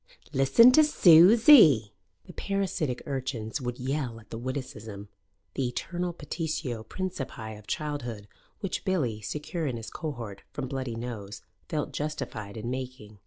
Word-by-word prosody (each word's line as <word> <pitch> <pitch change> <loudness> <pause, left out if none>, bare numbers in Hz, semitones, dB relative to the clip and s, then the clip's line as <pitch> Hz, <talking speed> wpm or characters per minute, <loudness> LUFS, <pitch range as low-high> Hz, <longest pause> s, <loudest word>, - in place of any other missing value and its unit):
"Listen 135 - +6
to 310 +4 +7
Susie!" 180 - +7 0.3
The 180 - -12
parasitic 185 -10 -2
urchins 130 -3 -3
would 125 -1 -4
yell 130 -3 -3
at 110 - -20
the 115 - -5
witticism 110 -6 -6 0.4
the 135 -2 -1
eternal 175 +8 -3
petitio 150 -7 -4
principii 135 - -5
of 105 - -18
childhood, 125 -9 -4 0.3
which 195 - -3
Billy, 135 - -1
secure 150 - -4
in 125 -3 -2
his 115 - -8
cohort 120 -10 -6
from 135 -2 -4
bloody 130 -3 -4
nose, 115 -4 -7 0.3
felt 150 -2 -2
justified 130 -9 -5
in 120 +3 -4
making. 130 -5 -7
130 Hz, 135 wpm, -28 LUFS, 115-160 Hz, 0.4 s, to